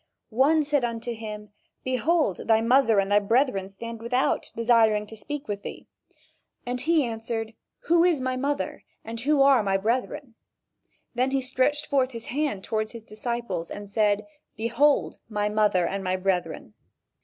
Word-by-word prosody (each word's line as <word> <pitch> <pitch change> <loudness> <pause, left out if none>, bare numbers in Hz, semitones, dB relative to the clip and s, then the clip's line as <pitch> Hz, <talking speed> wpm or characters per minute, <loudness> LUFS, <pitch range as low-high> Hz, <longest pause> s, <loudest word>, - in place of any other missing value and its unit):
One 290 +7 +3
said 290 -2 0
unto 235 0 -3
him: 210 -2 -8 0.3
"Behold 260 - 0
thy 220 -1 +5
mother 230 -1 +4
and 195 +1 0
thy 205 - +6
brethren 210 -2 +1
stand 230 +3 -8
without, 250 +3 0
desiring 225 -2 +3
to 220 - -11
speak 280 +7 -6
with 205 -1 -4
thee." - - -8 0.8
And 245 0 -2
he 315 0 +2
answered: 225 -1 -4 0.3
"Who 335 +1 +3
is 345 -5 +3
my 255 0 -1
mother, 280 +3 -2 0.2
and 225 +1 -6
who 280 +3 +3
are 275 -3 +5
my 195 -2 +1
brethren?" 245 +5 -2 0.8
Then 250 +2 +1
he 270 0 +1
stretched 260 +3 0
forth 265 -2 +1
his 230 -1 -7
hand 280 -9 -1
toward 215 +1 -2
his 230 -1 -10
disciples 215 -6 -4
and 205 0 -7
said: 210 0 +1 0.3
"Behold 235 +6 +2
my 210 -1 -1
mother 210 -4 +2
and 195 +2 -3
my 185 0 0
brethren." 180 - -2
230 Hz, 160 wpm, -26 LUFS, 210-265 Hz, 0.8 s, thy